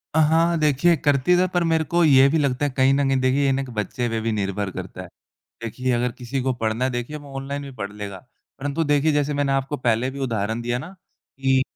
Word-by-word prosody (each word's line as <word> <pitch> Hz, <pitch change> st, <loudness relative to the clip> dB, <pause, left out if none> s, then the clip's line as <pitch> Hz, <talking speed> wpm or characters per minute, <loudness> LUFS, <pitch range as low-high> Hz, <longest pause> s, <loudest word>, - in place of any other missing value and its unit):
अ, -, -, +4 dB
हाँ, 150 Hz, -, +4 dB, 0.2 s
हाँ 170 Hz, 0 st, +1 dB
देखिए 155 Hz, +3 st, +3 dB
करते 145 Hz, +5 st, +3 dB
थे 185 Hz, +1 st, +3 dB
पर 175 Hz, -1 st, +2 dB
मेरे 160 Hz, -1 st, +2 dB
को 175 Hz, 0 st, +3 dB
ये 135 Hz, -3 st, +6 dB
भी 160 Hz, -, +1 dB
लगता 140 Hz, -1 st, 0 dB
है 145 Hz, -, -1 dB
कहीं 130 Hz, +1 st, +4 dB
न 140 Hz, 0 st, +2 dB
कहीं 135 Hz, -1 st, +2 dB
देखिए 130 Hz, +2 st, +2 dB
ये 135 Hz, -, +3 dB
ना 135 Hz, +1 st, 0 dB
एक 135 Hz, -, -7 dB
बच्चे 120 Hz, +4 st, -2 dB
पे 115 Hz, -, -1 dB
भी 115 Hz, -, -1 dB
निर्भर 100 Hz, -1 st, -2 dB
करता -, -, -7 dB
है। -, -, -9 dB, 0.6 s
देखिए 125 Hz, +3 st, -3 dB
अगर 120 Hz, 0 st, 0 dB
किसी 125 Hz, +2 st, -3 dB
को 130 Hz, 0 st, +1 dB
पढ़ना 110 Hz, +3 st, 0 dB
है 130 Hz, -, +1 dB
देखिए 120 Hz, +4 st, -4 dB
वो 140 Hz, -, -12 dB
ऑनलाइन 140 Hz, +1 st, -4 dB
भी 140 Hz, -, -8 dB
पढ़ 100 Hz, 0 st, -4 dB
लेगा। 100 Hz, -2 st, -7 dB, 0.4 s
परंतु 145 Hz, +3 st, -1 dB
देखिए 145 Hz, +1 st, +2 dB
जैसे 145 Hz, 0 st, 0 dB
मैंने 140 Hz, -1 st, 0 dB
आपको 135 Hz, +2 st, -1 dB
पहले 120 Hz, 0 st, 0 dB
भी 140 Hz, -, -9 dB
उदाहरण 110 Hz, 0 st, -2 dB
दिया 120 Hz, +1 st, -1 dB
ना 130 Hz, -, -7 dB, 0.5 s
कि 135 Hz, -1 st, +3 dB
135 Hz, 250 wpm, -23 LUFS, 120-145 Hz, 0.6 s, ये